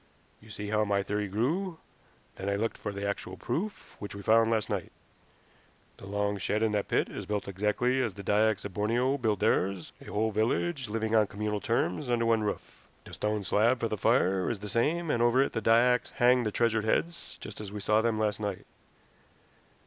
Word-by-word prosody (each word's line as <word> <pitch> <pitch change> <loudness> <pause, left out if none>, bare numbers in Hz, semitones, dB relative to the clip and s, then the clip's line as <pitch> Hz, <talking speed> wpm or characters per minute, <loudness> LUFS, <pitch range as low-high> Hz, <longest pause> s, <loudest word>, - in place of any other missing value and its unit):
You 110 - -17
see 105 -1 -6
how 110 0 +2
my 100 -1 +1
theory 105 +1 -2
grew. 160 - -1 0.6
Then 95 +1 -4
I 100 - +1
looked 110 +3 -1
for 105 - -4
the 100 0 -4
actual 95 -2 -4
proof, 190 - -4
which 100 -1 -7
we 100 - -8
found 115 +1 +4
last 110 -2 +1
night. - - -3 1.1
The 95 - -11
long 100 0 -1
shed 105 +4 0
in 110 - +2
that 105 -1 -1
pit - - +1
is - - -7
built 105 -1 -2
exactly 105 +7 +1
as 115 -7 -2
the 100 - -8
Dyaks 105 +1 +2
of 100 - -6
Borneo 120 +7 +1
build 110 -5 0
theirs 95 -4 0
a - - -12
whole 110 +2 -1
village 120 +5 0
living 110 +1 -2
on 110 -2 +4
communal 105 +1 -3
terms 115 - -1
under 120 -1 +1
one 115 -1 +3
roof. 105 -1 -5 0.2
The - - -13
stone 105 -1 -1
slab 115 +6 +2
for 115 - -1
the 110 - -1
fire 95 -4 +2
is 120 - -2
the 105 +1 -7
same, 155 +9 +1
and 115 - +1
over 120 +2 +4
it - - -3
the 115 - -1
Dyaks 120 +2 +3
hang 125 0 +4
the 105 - 0
treasured 115 0 +1
heads, 170 +9 -1
just - - -8
as 100 -2 -7
we 105 - -5
saw 105 +2 +2
them 115 -1 0
last 105 -1 0
night. 100 -3 -4
110 Hz, 210 wpm, -29 LUFS, 105-120 Hz, 1.1 s, found